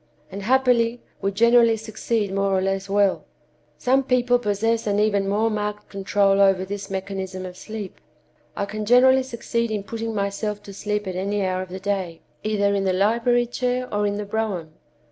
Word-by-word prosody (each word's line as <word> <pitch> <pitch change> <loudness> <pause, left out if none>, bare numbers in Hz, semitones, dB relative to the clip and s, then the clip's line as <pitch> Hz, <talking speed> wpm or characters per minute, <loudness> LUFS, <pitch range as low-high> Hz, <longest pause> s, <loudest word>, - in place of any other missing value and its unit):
And, 200 +2 -6
happily, 245 0 +2 0.2
we 195 - 0
generally 230 +2 +4
succeed 220 -1 -2
more 195 -1 +1
or - - +1
less 195 0 -2
well. 200 -1 +2 0.5
Some 265 +2 +2
people 250 -2 +2
possess 225 +1 0
an 205 0 +1
even 205 -2 +2
more 220 +3 +1
marked 210 0 -3
control 195 0 +2
over 195 -1 +4
this 200 +1 -6
mechanism 190 -1 -4
of 180 -1 -8
sleep. 215 0 -8 0.5
I 200 - -1
can 215 +1 -5
generally 255 +4 +5
succeed 235 -2 -2
in 210 -2 -2
putting 225 +1 -4
myself 205 +1 -2
to 200 - -10
sleep 210 +1 -2
at 185 -1 -4
any 200 +2 -1
hour 185 0 -1
of 185 - -7
the 185 +1 -6
day, 190 -4 -3 0.2
either 205 -2 +1
in 200 -1 0
the 190 - +2
library 235 +5 +2
chair 250 +1 -2
or 205 0 +1
in 205 0 -2
the 210 - -4
brougham. 200 -7 -3
205 Hz, 185 wpm, -23 LUFS, 195-230 Hz, 0.5 s, generally